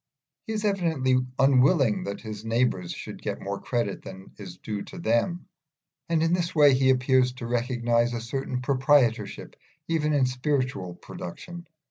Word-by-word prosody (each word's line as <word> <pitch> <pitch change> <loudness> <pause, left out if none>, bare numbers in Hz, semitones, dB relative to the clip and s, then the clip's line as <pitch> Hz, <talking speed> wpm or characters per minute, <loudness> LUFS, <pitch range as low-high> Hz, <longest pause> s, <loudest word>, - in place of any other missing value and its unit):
He 220 - -2
is 215 0 -2
evidently 165 -10 +1 0.2
unwilling 135 - +3
that 100 - -5
his 110 -1 -7
neighbours 115 -6 0
should - - -8
get - - -4
more 100 0 -5
credit 120 -5 -2
than 95 0 -11
is 90 -3 -9
due 105 0 -5
to 190 - -11
them, 170 +5 0 0.6
and 165 -1 +2
in 165 +1 +2
this 175 0 -1
way 145 -3 +7
he 130 0 +3
appears 130 0 +3
to 125 -2 -8
recognise 120 0 +1
a - - -2
certain 125 +2 -4
proprietorship 135 -3 +1 0.3
even 155 -2 0
in 140 -3 +3
spiritual 125 - -2
production. 175 - -9
130 Hz, 155 wpm, -26 LUFS, 115-150 Hz, 0.6 s, way